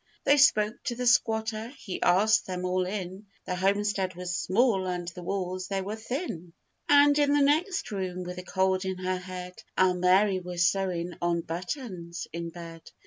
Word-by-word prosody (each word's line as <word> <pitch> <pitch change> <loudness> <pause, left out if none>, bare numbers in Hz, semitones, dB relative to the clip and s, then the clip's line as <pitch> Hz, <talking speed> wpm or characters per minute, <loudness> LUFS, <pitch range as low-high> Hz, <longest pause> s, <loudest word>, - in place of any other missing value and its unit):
They 285 - +5
spoke 215 -6 +4
to 240 - -2
the 250 +1 -3
squatter: 220 -2 +2
he 195 -8 -6
asked 205 +6 +4
them 185 -1 -3
all 180 0 0
in. 190 +1 -5 0.2
The - - -3
homestead 195 0 0
was 180 0 -4
small 195 0 +2
and 180 -1 -3
the 180 +1 -10
walls 185 0 -3
they 195 -1 -2
were 205 +3 -4
thin; 220 - -5 0.4
And 290 0 +6
in 290 -1 +3
the 290 -1 +4
next 350 - +1
room, 185 -2 -3
with 180 0 -6
a - - -7
cold 190 0 +1
in 190 -1 -3
her 185 0 -2
head, 180 0 -8 0.2
Our 185 -1 +4
Mary 185 +2 +3
was 175 -1 -1
sewing 180 -2 0
on 170 -1 +1
buttons 175 - -5
in 170 0 -4
bed. 165 -1 -10
185 Hz, 180 wpm, -28 LUFS, 180-215 Hz, 0.4 s, And